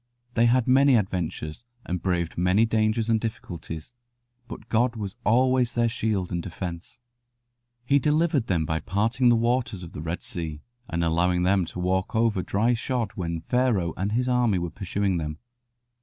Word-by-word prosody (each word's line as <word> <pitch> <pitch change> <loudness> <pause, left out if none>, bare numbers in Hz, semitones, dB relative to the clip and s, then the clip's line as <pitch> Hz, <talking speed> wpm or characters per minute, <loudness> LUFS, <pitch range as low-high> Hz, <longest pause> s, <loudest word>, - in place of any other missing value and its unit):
They 120 0 +4
had 125 0 +3
many 135 +1 +5
adventures, 90 -3 -2 0.2
and 90 0 -3
braved 85 -3 -1
many 90 +5 +3
dangers 110 0 +1
and 115 -1 +3
difficulties, 100 -5 -6 0.5
but 115 - -9
God 120 +2 +1
was 100 -3 -5
always 125 +2 +3
their 120 -1 +2
shield 110 -5 -1
and 85 - -1
defence. 85 +2 -7 0.9
He 140 +3 +4
delivered 150 -2 +1
them 85 -4 +1
by 80 +1 -1
parting 115 +8 +1
the 120 - +5
waters 115 -4 0
of 85 - -9
the 75 - -7
Red 80 +2 -4
Sea 80 -3 -5 0.3
and 85 +1 -1
allowing 90 +2 +2
them 95 0 +3
to 90 - -8
walk 95 +2 -1
over 110 -4 +2
dry 110 +7 +1
shod 120 -2 -2
when 85 -3 -3
Pharaoh 110 -6 +1
and 100 +4 -2
his 125 +2 +1
army 125 -5 +2
were 85 -1 -3
pursuing 95 0 -1
them. 75 -1 -4
100 Hz, 170 wpm, -25 LUFS, 90-120 Hz, 0.9 s, many